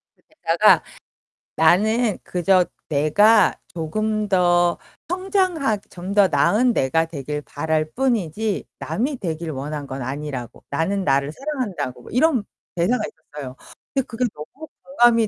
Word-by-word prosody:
그 - - -35
대사가 - - +3 0.7
나는 215 +7 +3
그저 180 +1 +2 0.2
내가 205 +9 +4
조금 215 +6 -2
더 175 -2 +3 0.3
성장하 365 - 0
좀 185 +2 -6
더 200 -1 +6
나은 210 - +3
내가 160 +2 +2
되길 150 -2 -5
바랄 155 +1 -1
뿐이지 220 - -1
남이 265 +5 -2
되길 165 -5 -4
원한 145 +1 -5
건 135 0 -6
아니라고. 130 -1 -5
나는 190 +7 0
나를 140 -2 +1
사랑한다고 250 - -4
뭐 - - -12
이런 255 -2 +3 0.3
대사가 215 +7 +1
있었어요. 140 -4 -10 0.4
근데 270 -2 0
그게 245 +1 -1
너무 260 - -10 0.2
공감이 240 -4 +4
185 Hz, 265 characters per minute, -22 LUFS, 155-235 Hz, 0.7 s, 더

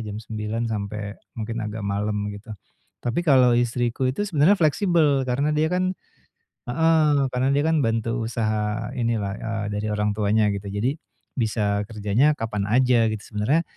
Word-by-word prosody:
jam 105 - -5
9.00 110 +1 -4
sampai 105 -2 -4 0.2
mungkin 115 +1 -4
agak 105 0 -5
malem 105 +1 -2
gitu, 105 +1 -9 0.5
tapi 120 +8 0
kalau 130 -7 +5
istriku 120 +1 0
itu 205 +11 -1
sebenarnya 180 +1 +3
fleksibel 155 -5 +2
karena 140 +5 +1
dia 155 +1 +2
kan 185 +1 0 0.7
heeh, 160 +4 +3 0.3
karena 125 +2 +1
dia 145 - +2
kan 160 0 +2
bantu 115 0 -1
usaha 110 -1 -2
ini 115 -1 +1
lah, 100 -2 -2
eee, 110 -1 -3
dari 105 +1 -3
orang 105 0 0
tuanya 105 0 +2
gitu 100 0 -4
jadi, 115 +10 -2 0.4
bisa 105 -2 0
kerjanya 110 +7 +2
kapan 105 -6 -3
aja 120 0 +3
gitu 110 -1 -3
sebenernya, 110 +12 0
115 Hz, 155 wpm, -24 LUFS, 105-135 Hz, 0.7 s, kalau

